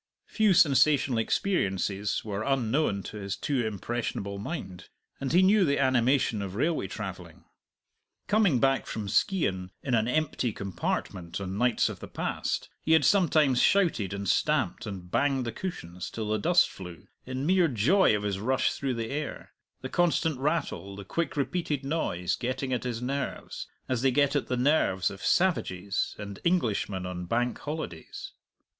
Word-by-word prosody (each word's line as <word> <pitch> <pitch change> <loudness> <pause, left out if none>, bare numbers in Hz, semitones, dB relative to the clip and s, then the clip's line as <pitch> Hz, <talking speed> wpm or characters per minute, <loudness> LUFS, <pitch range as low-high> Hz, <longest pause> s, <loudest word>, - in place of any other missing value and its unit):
Few 215 -4 +2
sensational 140 -4 +4
experiences 100 - 0
were 100 -1 -3
unknown 125 -4 0
to 105 - -7
his 100 -1 -4
too 135 -4 -1
impressionable 105 -2 -3
mind, 95 - -6 0.3
and 135 -1 -2
he 180 +3 +5
knew 200 +1 +5
the 140 -4 +2
animation 130 -3 +2
of 100 -1 -5
railway 160 +8 0
travelling. - - -7 0.8
Coming 205 - +3
back 135 +1 +2
from 105 -2 -4
Skeighan 100 - +1
in 130 - -2
an 110 -1 +3
empty 130 -4 0
compartment 90 -2 -3
on 95 -1 -4
nights 120 +2 +2
of - - -6
the - - -8
past, - - -3
he 160 - +2
had 160 -3 +5
sometimes 155 -9 +4
shouted 170 - +3
and 100 0 -4
stamped - - +1
and 90 -3 -7
banged 135 -3 +1
the 115 - -2
cushions 90 - -6
till 110 -2 -4
the 110 0 +1
dust 175 - +4
flew, 90 -3 -10 0.2
in 130 +1 -3
mere 180 0 +4
joy 135 - +3
of 105 - -3
his 100 -2 -1
rush 130 +5 +1
through 135 -3 -2
the 115 0 -4
air; 150 +1 -5 0.3
the 130 - -4
constant 165 -2 +1
rattle, 130 - -2
the 100 0 -9
quick 160 - -2
repeated 145 -1 -1
noise, 90 - -1
getting 130 +2 -3
at 125 -1 -2
his 120 -1 -3
nerves, 135 +1 -4 0.2
as 125 -3 -1
they 135 - +4
get 140 +2 +2
at 145 - 0
the 125 - -1
nerves 125 - +2
of 95 -1 -10
savages 100 - 0
and 100 -1 -7
Englishmen 110 - 0
on 90 -1 -5
Bank 120 +4 0
Holidays. 145 - -6
125 Hz, 165 wpm, -28 LUFS, 100-150 Hz, 0.8 s, he